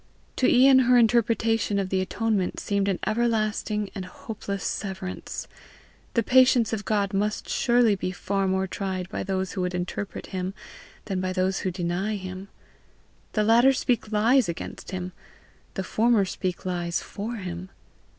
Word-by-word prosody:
To 255 - +3
Ian 260 +1 +7
her 250 - +7
interpretation 225 -2 +2
of 195 -1 -1
the 190 0 +1
atonement 205 -1 -1
seemed 200 -1 0
an 195 -2 +1
everlasting 215 -1 0
and 190 -3 -5
hopeless 200 0 -6
severance. 190 -2 -4 0.7
The 230 - +3
patience 250 -1 +5
of 210 -2 -3
God 200 -2 0
must 210 +2 -1
surely 240 -3 +3
be 185 -1 -2
far 195 +2 -1
more 190 0 +1
tried 190 -1 -3
by - - -4
those 190 -1 -2
who 190 - -3
would 180 0 -1
interpret 180 +2 -4
him, 185 +1 -3 0.5
than 190 -3 -2
by 185 0 -1
those 185 +1 0
who 190 - -1
deny 180 +4 -2
him: 185 0 -7 0.9
the 215 - +2
latter 235 +5 +5
speak 245 -4 -1
lies 225 +1 +3
against 170 - -6
him, 185 -1 -4 0.6
the 190 - -2
former 220 +1 +3
speak 185 -1 -4
lies 175 -2 -1
for 215 +4 -5
him! 185 -3 -6
200 Hz, 155 wpm, -26 LUFS, 185-225 Hz, 0.9 s, Ian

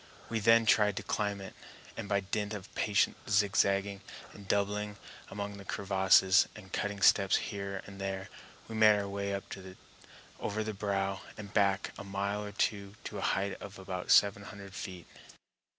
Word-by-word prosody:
We 115 - 0
then 115 +2 +5
tried 105 -2 +4
to - - -3
climb 100 -1 -1
it, 95 - -8 0.4
and 100 - -6
by 100 -1 +2
dint 105 +2 -2
of 100 -1 -9
patient 100 -2 +2
zigzagging 100 0 +2 0.3
and 100 -1 -12
doubling 105 +1 0 0.3
among 100 0 -5
the 100 - -9
crevasses, 95 -1 +4
and 95 -4 -13
cutting 105 -1 -2
steps 100 -1 +5
here 100 -1 -3
and 100 -1 -10
there, 95 0 -3 0.4
we 115 - -8
made 110 -1 +6
our 100 -1 -2
way 100 0 -3
up 100 0 -2 1.0
over 110 +1 -2
the 110 0 -3
brow 100 -1 -1 0.2
and 105 -1 -9
back 100 -2 +2
a - - -6
mile 100 +1 -2
or 105 - -6
two 100 0 -1
to 105 - -5
a - - -4
height 95 +1 -1
of 100 0 -9
about 95 -1 -6
seven 100 0 +5
hundred 100 -2 -10
feet. 90 -2 -7
100 Hz, 170 wpm, -31 LUFS, 100-105 Hz, 1.0 s, made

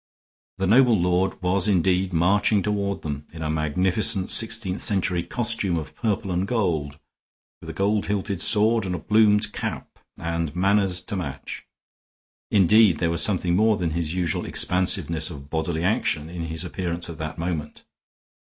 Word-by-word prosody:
The 95 - -1
noble 120 +1 +4
lord 90 +2 0
was 90 +2 +1
indeed 95 -1 +1
marching 95 +4 +2
toward 100 -1 -2
them 75 -1 -5
in 80 -1 -8
a 75 - -2
magnificent 90 +5 0
sixteenth 110 -4 -1
century 95 -3 0
costume 115 -4 -1
of 80 - -6
purple 105 -3 -2
and 90 +2 -1
gold, 80 - -1 0.6
with - - -10
a - - -6
gold 100 +1 0
hilted 100 -2 -2
sword 110 0 +5
and 90 - -2
a - - -3
plumed 105 +3 +2
cap, - - -6 0.2
and 85 -2 -3
manners 95 -1 +1
to 100 - -6
match. 70 -7 -6 0.8
Indeed, 100 -2 +4
there 85 -1 0
was 85 0 0
something 90 -2 +2
more 110 +2 +3
than 85 -3 -2
his 85 0 -3
usual 90 -3 -1
expansiveness 90 -3 +1
of 70 -3 -11
bodily 80 0 -2
action 85 -5 0
in 85 -1 -5
his 80 0 -4
appearance 85 +1 -4
at 85 -2 -9
that 80 0 -5
moment. 85 -3 -5
90 Hz, 160 wpm, -23 LUFS, 85-100 Hz, 0.8 s, sword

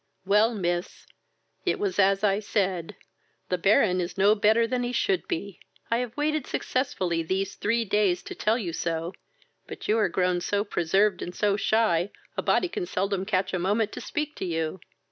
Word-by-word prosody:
"Well, 210 +4 +3
miss, 175 -2 -3 0.6
it - - +1
was 400 - -2
as 195 +1 +4
I 200 -1 +3
said; 190 -5 -1 0.5
the 180 - +1
Baron 185 -1 +3
is 175 +3 -5
no 200 +2 +5
better 220 +2 +3
than 250 +1 -1
he 245 0 -2
should 380 +7 0
be. 200 - -4 0.3
I 230 - +3
have 245 0 -4
waited 305 -1 0
successfully 185 -10 -1
these 190 +4 -2
three 230 +2 0
days 195 -3 +1
to - - -7
tell 220 +2 +1
you 180 -9 -4
so; 165 +2 -2 0.5
but - - -8
you 220 +2 +3
are 215 - +2
grown 180 -1 +1
so 205 +3 0
preserved 195 +1 +1
and 175 - -6
so 205 -1 +2
shy, 200 -4 +2 0.3
a - - -1
body 365 - +2
can 180 - -4
seldom 195 +1 -1
catch 190 -2 0
a 185 - 0
moment 205 +4 +1
to - - -7
speak 300 0 -3
to - - -3
you." 165 0 -2
200 Hz, 185 wpm, -26 LUFS, 180-225 Hz, 0.6 s, no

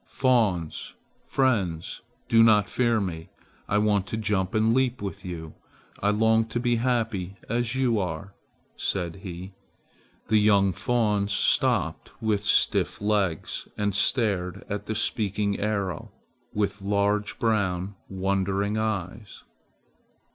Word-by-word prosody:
Fawns! 110 - 0 0.3
Friends, 100 -11 0 0.3
do 115 - +5
not 105 -3 +5
fear 120 -3 +1
me. 85 -5 -4 0.4
I 105 - +2
want 105 -2 +2
to 110 - -3
jump 100 -3 -1
and 110 +1 +3
leap 130 0 +1
with 100 -1 -6
you. 85 -4 -7 0.5
I 105 - +2
long 110 +1 +3
to 115 +2 -3
be 120 -1 +1
happy 115 -6 -1
as 120 +2 -1
you 125 -4 +2
are," 90 +1 -4 0.4
said 85 -3 -2
he. 95 0 -8 0.7
The 110 - +4
young 100 -2 +4
fawns 105 0 0
stopped - - +1
with 105 -2 0
stiff - - +2
legs 100 -6 -1
and 105 -1 0
stared 100 -5 0
at 105 0 -4
the 110 - -2
speaking 105 -2 0
arrow 100 -5 -2 0.4
with 100 -1 -1
large 100 +1 0
brown 100 -4 0 0.2
wondering 100 +2 0
eyes. 105 -1 -4
105 Hz, 125 wpm, -26 LUFS, 95-110 Hz, 0.7 s, do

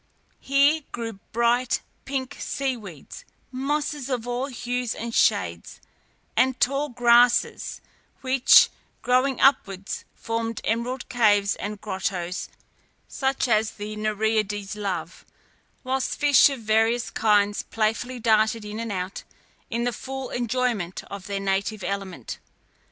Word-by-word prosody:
Here 280 +3 +3
grew 225 -4 -5
bright, 235 +2 +2 0.2
pinky 270 0 -4
sea 270 -2 -2
weeds, 190 - -10 0.3
mosses 285 +1 -2
of 245 -3 -2
all 245 +2 -2
hues 245 -2 -3
and 230 +1 -5
shades, 85 - +1 0.6
and 260 0 +2
tall 280 +3 +1
grasses, 240 -1 +3 0.4
which, 260 -1 +6 0.3
growing 255 +2 +2
upwards, 195 -8 +2
formed 230 -1 -3
emerald 235 +3 -2
caves 205 -4 +3
and 210 0 -5
grottoes 185 -3 -3 0.6
such 265 -1 -1
as 220 -1 +2
the 210 +1 -6
Nereides 215 -1 -1
love, 185 -4 -4 0.6
whilst 260 0 -1
fish 290 -2 +6
of 270 -4 -5
various 225 +2 +2
kinds 205 -1 +2
playfully 225 +3 -2
darted 220 -1 +2
in 210 +1 -6
and 230 -1 -3
out, 185 0 -4 0.5
in 235 -2 -1
the 245 0 0
full 265 +2 -6
enjoyment 240 -7 -1
of 200 -1 -7
their 200 -1 -2
native 195 +2 -1
element. 190 - -5
230 Hz, 120 wpm, -25 LUFS, 205-255 Hz, 0.6 s, which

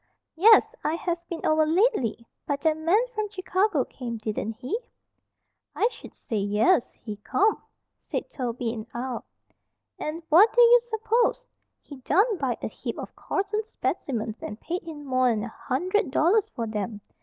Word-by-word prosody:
"Yes. 440 +5 +6
I 310 - 0
haven't 340 0 -3
been 335 - -5
over 310 0 +4
lately. 315 - +1 0.2
But 280 -1 -1
that 315 +1 +3
man 340 +9 +2
from 430 -2 -2
Chicago 370 - 0
came, 235 -3 -6
didn't 220 0 -3
he?" 255 - -4 1.0
"I 455 - +3
sh'd - - -13
say 225 - -4
'yes'! 210 - +2
He 215 -3 -8
come," 405 - +1 0.4
said - - -4
Toby, 245 -3 -3
in 220 -1 -7
awe. 245 0 -3 0.8
"An' 320 +2 -4
what 395 +8 +7
d'ye 485 0 +7
s'pose? 470 +2 +1 0.4
He 285 - -11
done 400 - +2
buyed - - -2
a - - 0
heap - - -6
of - - -8
Corson's 420 +2 -2
spec'mens 225 -4 -2
an' 210 - -5
paid 350 +9 -4
him 310 -3 -9
more'n 255 -5 +2
a 240 - -5
hundred 360 - -1
dollars 365 +10 +3
for 230 -3 -4
'em. 210 0 -3
315 Hz, 155 wpm, -26 LUFS, -, 1.0 s, what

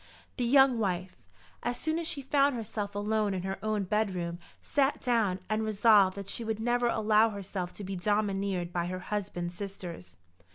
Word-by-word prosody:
The 245 - 0
young 265 -1 +5
wife, 185 -3 -2 0.5
as 240 0 -2
soon 315 +1 -1
as 335 - -3
she 280 -3 -2
found 280 0 +3
herself 210 -3 -4
alone 210 -1 0
in 180 - -3
her 190 0 -3
own 215 -2 0
bedroom, 185 -4 -1 0.2
sat 280 0 +1
down 225 -7 +1
and 215 0 0
resolved 210 -3 +5
that 200 -1 -6
she 230 - -2
would 220 -1 -2
never 240 +1 +1
allow 220 -1 +4
herself 195 -3 -5
to 205 - -8
be 195 0 -4
domineered 195 -2 0
by 175 -1 -1
her 185 +1 -3
husband's 185 -3 -4
sisters. 175 - -7
205 Hz, 175 wpm, -30 LUFS, 185-225 Hz, 0.5 s, young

